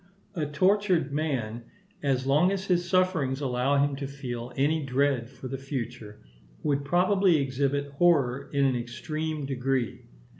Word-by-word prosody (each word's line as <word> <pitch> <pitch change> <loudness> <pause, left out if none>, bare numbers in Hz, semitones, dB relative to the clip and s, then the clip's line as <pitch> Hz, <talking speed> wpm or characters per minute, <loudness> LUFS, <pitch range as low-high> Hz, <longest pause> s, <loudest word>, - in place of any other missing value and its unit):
A 155 -6 -2
tortured 185 -1 +2
man, 125 -7 -2 0.4
as 130 -2 0
long 150 +7 +4
as 195 -1 -2
his 175 -2 +1
sufferings 170 -8 +2
allowed 140 +1 +2
him 140 - -5
to 140 -1 -4
feel 125 -3 -6
any 150 +3 +1
dread 135 -2 +1
for 130 - -9
the 135 +1 -5
future, 120 - -6 0.4
would 140 -1 +1
probably 180 +3 +3
exhibit 140 +1 -1
horror 140 -4 +2
in 140 -1 +2
an 130 -2 +2
extreme 155 +5 -4
degree. 135 -2 -1
140 Hz, 145 wpm, -27 LUFS, 130-160 Hz, 0.4 s, long